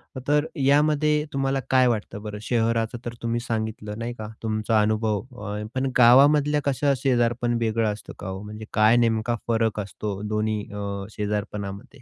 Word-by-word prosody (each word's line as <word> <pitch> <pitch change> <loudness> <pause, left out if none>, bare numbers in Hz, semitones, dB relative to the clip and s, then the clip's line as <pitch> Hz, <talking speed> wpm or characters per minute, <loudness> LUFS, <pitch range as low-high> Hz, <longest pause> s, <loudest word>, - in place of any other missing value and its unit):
अ, - - -4
तर 150 +1 +3 0.2
यामध्ये 150 +1 +3
तुम्हाला 135 0 0
काय 130 -1 +5
वाटतं 105 -3 -2
बरं? 105 -1 -6
शहराचं 115 0 0
तर 120 - -4
तुम्ही 115 0 -1
सांगितलं, 110 -2 -3
नाही 120 +1 -3
का? 110 -3 -7 0.2
तुमचा 110 0 +1
अनुभव 110 -1 +1 0.2
अ, 105 +1 -4
पण 130 0 0
गावामधल्या 145 +4 +6
कसं 140 +1 +2
शेजारपण 120 -2 +1
वेगळं 110 -1 +1
असतं 105 - -10
का - - -6
हो? 95 +1 -5
म्हणजे, 105 +1 -8
काय 110 +2 +5
नेमका 115 0 +1
फरक 110 -2 +1
असतो 100 0 -5
दोन्ही 105 0 -1
अ, 100 0 -4 0.3
शेजारपणामध्ये? 100 -1 -4
115 Hz, 160 wpm, -24 LUFS, 105-130 Hz, 0.3 s, गावामधल्या